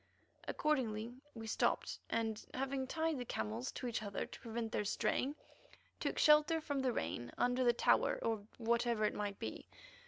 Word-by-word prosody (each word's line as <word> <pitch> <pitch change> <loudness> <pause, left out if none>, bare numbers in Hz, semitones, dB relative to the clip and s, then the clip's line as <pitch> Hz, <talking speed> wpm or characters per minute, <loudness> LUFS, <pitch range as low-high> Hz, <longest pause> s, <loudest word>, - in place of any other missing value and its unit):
Accordingly, 235 -6 0 0.2
we 225 -1 -6
stopped, 220 - +1
and, 225 -1 -1
having 265 0 -1
tied 320 -1 0
the - - -2
camels 110 - -3
to - - -5
each 235 -2 -1
other 200 -2 -3
to - - -11
prevent 230 -1 -3
their - - 0
straying, 265 +7 0 0.6
took - - -1
shelter 300 +2 +6
from 285 -3 -2
the 260 -1 +2
rain 120 - -3
under 250 +1 +2
the 240 - +6
tower 235 - +3
or 225 -2 0 0.2
whatever 235 -1 +2
it - - +1
might 205 -1 -3
be. - - -5
235 Hz, 165 wpm, -37 LUFS, 220-265 Hz, 0.6 s, shelter